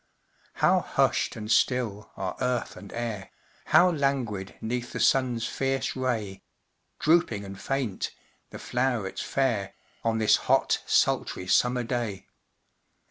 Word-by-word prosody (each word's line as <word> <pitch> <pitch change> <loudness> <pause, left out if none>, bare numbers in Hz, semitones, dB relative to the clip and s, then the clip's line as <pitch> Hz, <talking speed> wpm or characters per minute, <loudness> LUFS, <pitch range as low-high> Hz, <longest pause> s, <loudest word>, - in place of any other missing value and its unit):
How - - +3
hushed - - +1
and 110 0 -5
still 110 -3 +1
are 95 -1 -3
earth 125 -2 -1
and 100 - -11
air, 115 -4 -4 0.4
How 180 +1 +5
languid 130 - -1
'neath 120 +2 -3
the - - -3
sun's 125 -4 +2
fierce 135 0 -1
ray 115 -7 -2 0.6
Drooping 155 -11 +2
and 100 0 -9
faint 135 -8 -2 0.4
the - - -8
flowrets 120 -6 -1
fair, 115 -8 -1 0.3
On 115 -1 +1
this 110 -1 +4
hot, - - +3
sultry, 90 - +1
summer 125 +6 +2
day! 115 -5 -3
120 Hz, 125 wpm, -27 LUFS, 105-130 Hz, 0.6 s, How